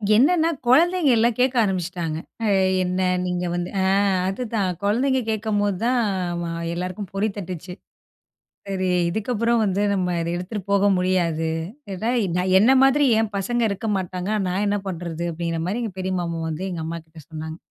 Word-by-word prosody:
என்னான்னா, 320 +7 +4 0.2
குழந்தைங்க 330 +5 +4
எல்லாம் 230 +1 +3
கேக்க 255 0 +2
ஆரம்பிச்சுட்டாங்க. 175 -4 -2 0.3
அ - - +1 0.4
என்னா? 185 +1 0 0.2
நீங்க 180 0 -2
வந்து 175 0 -2
அ - - +2 0.4
அதுதான் 195 -3 -2
கொழந்தைங்க 255 +6 +2
கேக்கும்போது 205 -3 0
தான் 245 +1 +2 0.3
ஆமா 170 0 -3 0.2
எல்லாருக்கும் 180 +2 -5
பொறி 200 +2 +1
தட்டுச்சு. 180 -2 -6 1.0
சரி, 190 -1 -1 0.2
இதுக்கப்புறம் 230 +4 0
வந்து 195 -1 0
நம்ம 185 -2 0
அத 165 - -2
எடுத்துட்டு 180 +4 -4
போக 200 0 +3
முடியாது! 175 -3 +1 0.4
இது 195 - -4
தான், 240 +2 +1
எ - - 0
நான் 185 +1 +1
என்ன 220 +6 +5
மாதிரி 270 +2 +5 0.2
என் 220 -1 -1
பசங்க 235 +5 -1
இருக்க 200 +3 -4
மாட்டாங்க, 185 +1 -3 0.2
நான் 185 +2 -1
என்னா 205 0 +1
பண்ணுறது? 170 -2 -4
அப்படிங்கிற 165 0 -3
மாரி 200 +7 -2
எங்க 220 -5 -3
பெரிய 185 0 -2
மாமா 170 -1 -3
வந்து, 160 +2 -4
எங்க 175 -2 -4
அம்மாகிட்ட 160 0 -7
சொன்னாங்க. 160 0 -6
190 Hz, 165 wpm, -23 LUFS, 175-225 Hz, 1.0 s, என்ன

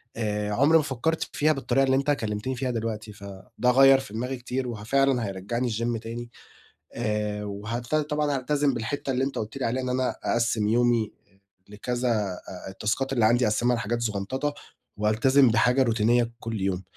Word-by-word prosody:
آآ، 105 -2 -2
عُمري 145 +8 +5
ما 155 - +2
فكّرت 145 +4 -1
فيها 155 +1 +3
بالطريقة 135 -1 +1
اللي 130 0 +2
أنت 140 +2 +1
كلمتِني 110 0 -2
فيها 130 0 -2
دلوقتي، 110 -2 -4
فده 100 +4 -2
غيّر 135 +1 +7
في 105 - -9
دماغي 125 +4 -3
كتير 125 +1 -3
وهَ 110 -3 -6
فعلاً 135 0 +2
هيرجّعني 105 +6 -2
الgym 115 +1 -1
تاني، 115 +1 -7 0.6
آآ، 105 -2 -2
وهلت 110 +7 -4
طبعًا 150 -1 0
هالتزم 140 +1 +1
بالحتة 135 +4 -3
اللي 130 +1 0
أنت 135 - -2
قُلت 110 +5 -4
لي 135 - -2
عليها 130 +3 -1
إن 125 - -2
أنا 130 0 0
أقَسِّم 115 -2 +1
يومي 120 -1 +2 0.2
آآ، 95 - -30 0.3
لكذا 120 +4 -2
آآ، 95 -4 -3
التاسكات 115 +8 -2
اللي 120 -4 +3
عندي 120 +2 +4
أقَسّمها 120 +3 +2
لحاجات 115 +1 -2
زغنططة، 115 +7 -2 0.4
وألتزم 120 +5 +4
بحاجة 125 +4 +3
روتينية 115 +1 +2
كُلّ 115 -4 -4
يوم. 95 -1 -1
120 Hz, 175 wpm, -26 LUFS, 105-130 Hz, 0.6 s, غيّر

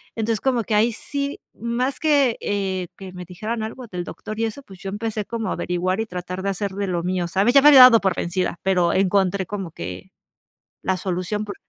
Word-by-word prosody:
Entonces, 225 -1 -1
como 250 -3 +1
que 215 - -1
ahí 225 +3 +3
sí, 280 +4 -4
más 240 +4 -2
que, 285 -6 +3
eh, 190 -3 -2
que 190 -2 -9
me 180 -1 -8
dijeran 215 +6 -4
algo 235 +3 -7
del 180 -3 -5
doctor 215 +3 -7
y 225 - +2
eso, 225 +6 -5
pues, 190 -7 -14
yo 195 - -6
empecé 210 +1 -3
como 225 0 -3
a - - 0
averiguar 180 +3 -1
y 225 - 0
tratar 180 -2 -6
de 195 - -1
hacer 195 +1 -2
de 200 0 -3
lo 175 -2 -1
mío, 180 -1 -1
¿sabes? 195 +7 +2
Ya 275 - +8
me 295 - +6
había 275 -3 +10
dado 250 -3 +9
por 190 -2 +1
vencida, 175 -1 -2
pero 180 -3 +2
encontré 190 0 +2
como 195 -4 -5
que 90 - -8 0.7
la 190 - +1
solución 185 +3 -2
por 200 - -7
200 Hz, 220 wpm, -22 LUFS, 185-230 Hz, 0.7 s, había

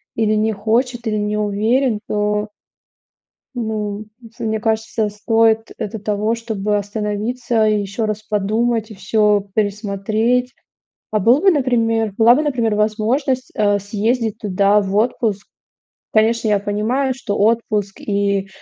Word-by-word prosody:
или 215 -1 +1
не 220 +1 +1
хочет, 235 +4 -1
или 215 -1 0
не 210 0 -1
уверен, 215 +4 +1
то 210 0 0 1.1
Ну, 215 -3 -3 0.2
ф 230 0 -16
мне 220 -1 -1
кажется, 220 0 0
стоит 225 +1 +1
это 220 +2 -4
того, 210 +2 -1
чтобы 215 -3 -2
остановиться 215 +3 -1
и 215 -1 +2
еще 200 +3 -3
раз 215 0 -2
подумать, 220 +2 0
и - - -8
всё 205 +1 +1
пересмотреть. 215 +4 0 0.6
А 215 - +1
был 235 +8 +4
бы, 385 0 +5
например, 230 - +1
была 235 +2 +6
бы, 295 - +1
например, 240 -8 0
возможность, 240 +5 0
э, 205 -2 +2
съездить 215 +2 -1
туда 200 0 +2
в 195 0 -3
отпуск? 215 -2 0 0.7
Конечно, 225 +1 +2
я 205 -1 +3
понимаю, 220 +7 -1
что 205 -5 -4
отпуск 210 -2 0
и 200 -1 0
215 Hz, 135 wpm, -19 LUFS, 205-230 Hz, 1.1 s, была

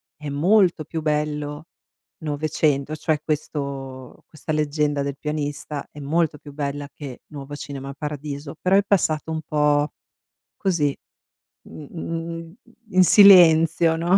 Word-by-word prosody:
è 150 -1 -7
molto 175 +2 +3
più 160 +1 -4
bello 150 0 -2 0.6
900, 150 -1 0
cioè 155 0 -1
questo 140 -4 -5
questa 155 0 -6
leggenda 150 -1 0
del 140 0 -4
pianista. 145 -1 -4
È 150 - -11
molto 155 +1 0
più 145 - -12
bella 145 0 -4
che 135 -5 -9
Nuovo 145 -1 -8
Cinema 140 -1 -7
Paradiso, 145 0 -6
però 185 +1 +3
è 200 - +4
passato 160 -6 +1
un 160 - -2
po’, 150 0 +2 0.7
così, 165 -8 0 0.7
mhmm, 165 +2 -7 0.4
in 185 -2 +5
silenzio, 165 -4 +7
no? 175 +4 +3
150 Hz, 125 wpm, -23 LUFS, 145-165 Hz, 0.7 s, silenzio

